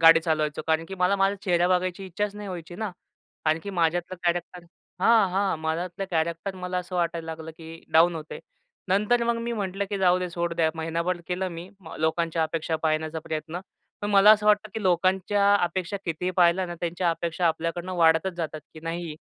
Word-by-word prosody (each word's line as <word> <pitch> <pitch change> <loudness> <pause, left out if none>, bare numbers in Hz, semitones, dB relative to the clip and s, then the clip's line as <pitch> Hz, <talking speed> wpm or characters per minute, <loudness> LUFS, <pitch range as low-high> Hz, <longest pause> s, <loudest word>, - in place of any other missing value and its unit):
गाडी 165 0 +8
चालवायचो 155 -2 -1
कारण 160 0 +2
की 195 - -6
मला 180 +1 +2
माझा 195 +1 +2
चेहरा 175 -1 +2
बघायची 185 +1 0
इच्छाच 205 +3 -2
नाही 205 -1 -7
व्हायची 175 -2 -7
ना. 220 -1 -3 0.6
आणखी 160 +6 +1
माझ्यातलं 175 0 0
कॅरेक्टर 175 0 -1 0.4
हां, 215 -1 +5
हां. 195 -1 +1
माझ्यातलं 170 +4 -3
कॅरॅक्टर 170 +3 -1
मला 180 0 -3
असं 180 0 -5
वाटायला 170 -1 -1
लागलं, 160 0 -6
की 165 0 -12
डाउन 170 +2 +5
होत 155 -2 -5
आहे. - - -7 0.5
नंतर 210 +5 +3
मग 235 0 +1
मी 235 0 -2
म्हटलं 200 -2 -2
की 200 - -1
जाऊदे 180 -1 +3
सोड 170 0 -2
द्या 160 -1 +2
महिनाभर 170 +2 -2
केलं 185 +1 -1
मी 170 +1 -8 0.3
लोकांच्या 165 +1 +1
अपेक्षा 160 0 -1
पाळण्याचा 155 0 0
प्रयत्न, 160 +3 -5 0.4
पण 205 0 -2
मला 200 +1 +7
असं 210 -1 +1
वाटतं 210 0 +4
की 220 - -3
लोकांच्या 190 +2 +3
अपेक्षा 180 +2 -2
कितीही 170 +2 -2
पाळल्या 180 +1 +4
ना. 175 - -5
त्यांच्या 175 0 0
अपेक्षा 170 +1 -1
आपल्याकडनं 165 +3 -2
वाढतच 165 +2 +4
जातात, 155 -2 -4
की 155 - -10
नाही 165 0 -4
175 Hz, 185 wpm, -26 LUFS, 165-190 Hz, 0.6 s, गाडी